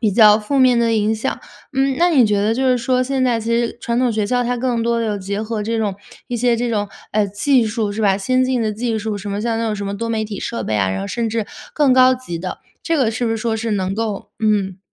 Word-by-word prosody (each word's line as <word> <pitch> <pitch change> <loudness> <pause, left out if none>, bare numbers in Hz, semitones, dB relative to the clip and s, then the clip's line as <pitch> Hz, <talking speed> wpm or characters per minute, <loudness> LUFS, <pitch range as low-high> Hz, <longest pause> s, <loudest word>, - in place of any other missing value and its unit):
比 220 -3 +2
较 210 -1 +7
负 270 +6 -1
面 255 -2 +5
的 230 -1 +2
影 215 +1 +1
响。 215 - -3 0.3
嗯， 270 0 +1
那 350 +1 +4
你 265 -7 +5
觉 210 -1 +1
得 215 +2 +1
就 265 +3 -1
是 250 - +4
说， 255 +1 +1
现 265 0 -1
在 245 -2 +2
其 225 +1 -5
实 235 0 0
传 235 +1 -1
统 250 -1 +2
学 215 -2 -1
校 245 +3 +1
它 245 0 -1
更 240 -2 -1
多 235 0 +1
地 - - -1
有 210 -1 -2
结 200 +2 -3
合 220 -1 -3
这 225 +2 -1
种 205 -3 -1 0.3
一 245 - -3
些 240 0 +2
这 240 +1 -1
种， 205 -2 -1 0.2
呃， 210 -1 +2
技 240 +5 +2
术， 215 -1 -2
是 215 - -4
吧？ 200 -3 +3
先 255 +6 +1
进 255 -2 0
的 215 -1 0
技 225 0 -2
术， 215 0 -3
什 200 +1 -6
么 200 +1 -2
像 225 0 -1
那 230 - -1
种 215 - -1
什 200 - -4
么 200 - -3
多 230 +2 -3
媒 220 -1 -1
体 210 -2 -6
设 235 - -3
备 110 - -2
啊， 95 -2 +1
然 95 0 -2
后 100 - -4
甚 230 - -2
至 220 -1 -2 0.3
更 290 -4 +4
高 255 0 +6
级 250 -10 -6
的。 180 +2 -5 0.2
这 330 -1 0
个 250 -6 +2
是 230 +2 -2
不 225 - 0
是 225 - 0
说 225 0 -1
是 225 0 -3
能 190 -1 -1
够 215 -2 -4
嗯， 200 -3 +1
225 Hz, 310 characters per minute, -19 LUFS, 210-245 Hz, 0.3 s, 较